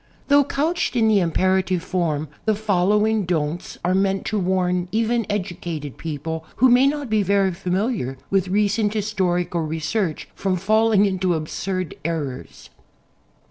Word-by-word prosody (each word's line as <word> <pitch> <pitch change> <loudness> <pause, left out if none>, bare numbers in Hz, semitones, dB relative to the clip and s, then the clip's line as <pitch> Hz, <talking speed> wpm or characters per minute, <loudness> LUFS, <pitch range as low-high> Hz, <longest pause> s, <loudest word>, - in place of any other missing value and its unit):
Though 285 0 +6
couched 300 +2 -1
in 225 -2 +3
the 215 -2 +4
im 170 -3 0
perative 185 0 +1
form, 160 -5 -1 0.2
the 220 -1 +2
following 210 +1 +2
"Don'ts" 165 -2 -2
are 180 - +2
meant 195 0 +1
to 215 - -1
warn 180 -1 0
even 230 0 0
educated 175 -7 -4
people, 160 +1 -4
who 260 +2 +5
may 250 +3 +5
not 290 -1 -1
be 215 -2 +2
very 195 0 +2
familiar 180 - -2
with 195 -2 +2
recent 205 +2 +1
historical 180 -5 0
research, 160 +3 -2
from 190 -1 -1
falling 215 +2 +3
into 185 -3 0
absurd 185 +3 -3
errors. 150 -5 -5
190 Hz, 140 wpm, -22 LUFS, 175-215 Hz, 0.2 s, Though